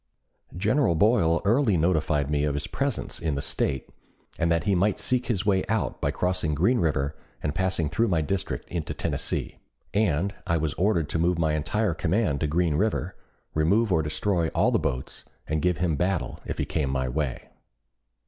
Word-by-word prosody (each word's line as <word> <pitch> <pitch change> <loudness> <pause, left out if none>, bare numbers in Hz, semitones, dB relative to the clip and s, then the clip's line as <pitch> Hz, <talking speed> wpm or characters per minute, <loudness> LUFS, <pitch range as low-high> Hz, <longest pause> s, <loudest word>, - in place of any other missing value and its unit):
General 110 - +2
Boyle 85 -3 +3
early 110 -2 +3
notified 80 -3 +1
me 75 0 0
of 75 -1 0
his 75 - -1
presence 140 -2 -2
in 80 -3 -1
the - - -2 0.2
State, 65 -2 -1 0.5
and 85 0 +2
that 85 -1 +2
he 100 - +2
might 95 +2 +2
seek 125 0 -1
his 105 -7 0
way 95 -2 +3
out 110 0 -1
by - - +1
crossing 90 -4 0
Green 115 - +3
River 75 -3 0 0.3
and 75 - -1
passing 95 -2 0
through 115 +9 +1
my 85 -5 +2
district 90 +5 -2
into 85 -3 -4
Tennessee; - - -3 0.3
and 100 -2 +1
I 85 - +2
was 75 -2 -1
ordered 90 -4 +1
to 80 - -1
move 85 +1 +2
my 80 -2 +1
entire 95 +6 0
command 80 -1 0
to 75 - +1
Green 80 +1 +1
River, 95 0 0 0.4
remove 95 +7 +2
or 80 - +3
destroy 85 +3 0
all - - +3
the - - +2
boats, 65 +1 -3 0.2
and 80 0 -1
give 90 -1 +1
him 85 -4 +1
battle 90 +3 -1
if - - -3
he - - -1
came 75 -4 -1
my 65 -1 -1
way. 65 0 -3
85 Hz, 185 wpm, -26 LUFS, 75-100 Hz, 0.5 s, Boyle